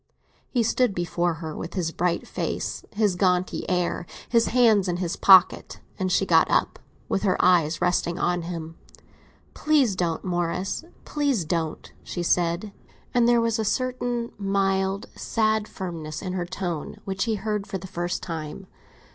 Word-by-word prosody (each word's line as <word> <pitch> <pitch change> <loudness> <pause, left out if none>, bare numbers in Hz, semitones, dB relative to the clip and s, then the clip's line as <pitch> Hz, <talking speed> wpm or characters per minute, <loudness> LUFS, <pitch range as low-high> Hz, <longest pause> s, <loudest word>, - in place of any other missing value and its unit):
He 240 -3 +1
stood 230 -1 +1
before 175 0 0
her 160 -1 -6
with 165 - -6
his 170 -4 -1
bright 170 0 -1
face, - - -3
his 205 -3 +1
jaunty 180 -1 0
air, 180 -1 -1 0.2
his 230 -1 +3
hands 220 -5 +4
in 175 -1 -1
his 180 0 -2
pockets; 190 -1 +5 0.2
and 185 -1 0
she 190 +2 +3
got 165 -3 +4
up, - - +1 0.3
with 195 - 0
her 190 -3 +2
eyes 170 -2 +3
resting 175 -1 +1
on 175 -1 0
his 170 +1 -5
own. 165 0 -7 0.8
"Please 285 -9 +2
don't, 170 -3 -1
Morris; 175 - -1 0.2
please 280 - 0
don't," 165 -1 -3
she 175 - -4
said; 175 +4 0 0.4
and 240 -1 +4
there 240 0 +5
was 230 -1 0
a - - +1
certain 245 +1 -1
mild, 195 +1 0
sad 220 -1 0
firmness 165 -4 -6
in 185 -1 -3
her 180 -2 -2
tone 175 -4 -4
which 195 +1 -1
he 225 -2 0
heard 210 0 -3
for 195 -1 -3
the 185 - -10
first 175 -1 -3
time. 160 +2 -6
185 Hz, 165 wpm, -25 LUFS, 175-215 Hz, 0.8 s, pockets